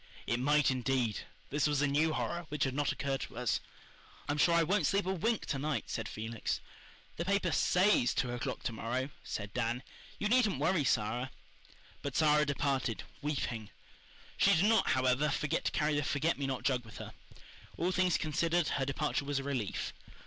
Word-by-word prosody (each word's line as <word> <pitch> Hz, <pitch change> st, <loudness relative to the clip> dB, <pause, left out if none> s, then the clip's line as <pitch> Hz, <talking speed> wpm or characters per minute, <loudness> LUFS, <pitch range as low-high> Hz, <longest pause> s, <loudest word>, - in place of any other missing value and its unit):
It 115 Hz, -, 0 dB
might, 145 Hz, +2 st, +3 dB
indeed. 125 Hz, -4 st, 0 dB, 0.3 s
This 145 Hz, +1 st, +2 dB
was 145 Hz, -2 st, +1 dB
a 145 Hz, -, +3 dB
new 150 Hz, +3 st, +2 dB
horror, 170 Hz, +2 st, -2 dB
which 150 Hz, 0 st, -1 dB
had 135 Hz, -, 0 dB
not 145 Hz, +1 st, +1 dB
occurred 135 Hz, -1 st, -2 dB
to -, -, -7 dB
us. 125 Hz, -2 st, +1 dB, 0.7 s
"I'm 145 Hz, +1 st, -1 dB
sure 170 Hz, +3 st, +5 dB
I 170 Hz, -, +5 dB
won't 200 Hz, +6 st, +2 dB
sleep 200 Hz, -1 st, +1 dB
a 190 Hz, -, 0 dB
wink 225 Hz, +5 st, 0 dB
to 140 Hz, -, -2 dB
night," 150 Hz, +1 st, -2 dB
said 115 Hz, -2 st, -3 dB
Felix. 110 Hz, 0 st, -3 dB, 0.6 s
"The 170 Hz, -, -2 dB
paper 200 Hz, -2 st, +1 dB
SAYS 180 Hz, -5 st, +3 dB
two 125 Hz, -, 0 dB
o'clock 125 Hz, +2 st, -4 dB
to 115 Hz, -, -2 dB
morrow," 125 Hz, +5 st, -2 dB
said 100 Hz, -1 st, -5 dB
Dan. 120 Hz, +1 st, -1 dB, 0.3 s
"You 210 Hz, -, 0 dB
needn't 220 Hz, -, +3 dB
worry, 155 Hz, +3 st, +2 dB
Sara." 125 Hz, +1 st, 0 dB, 0.7 s
But 140 Hz, -2 st, -4 dB
Sara 150 Hz, -1 st, +4 dB
departed, 135 Hz, -5 st, 0 dB, 0.2 s
weeping. 125 Hz, -7 st, -2 dB, 0.7 s
She -, -, +5 dB
did 175 Hz, -, +3 dB
not, 225 Hz, +1 st, +4 dB
however, 130 Hz, +3 st, +2 dB
forget 145 Hz, +1 st, -1 dB
to -, -, +1 dB
carry 150 Hz, 0 st, +1 dB
the 145 Hz, -, +2 dB
forget 150 Hz, +3 st, +1 dB
me 140 Hz, -, -1 dB
not 130 Hz, -1 st, -3 dB
jug 125 Hz, -3 st, +1 dB
with 115 Hz, -, -12 dB
her. -, -, -8 dB, 0.6 s
All 175 Hz, +2 st, +1 dB
things 185 Hz, -2 st, +2 dB
considered, 165 Hz, +2 st, +1 dB
her 135 Hz, -, 0 dB
departure 145 Hz, +1 st, -1 dB
was 145 Hz, 0 st, -1 dB
a 135 Hz, -, -1 dB
relief. 130 Hz, -8 st, -2 dB
145 Hz, 190 wpm, -33 LUFS, 130-160 Hz, 0.7 s, sure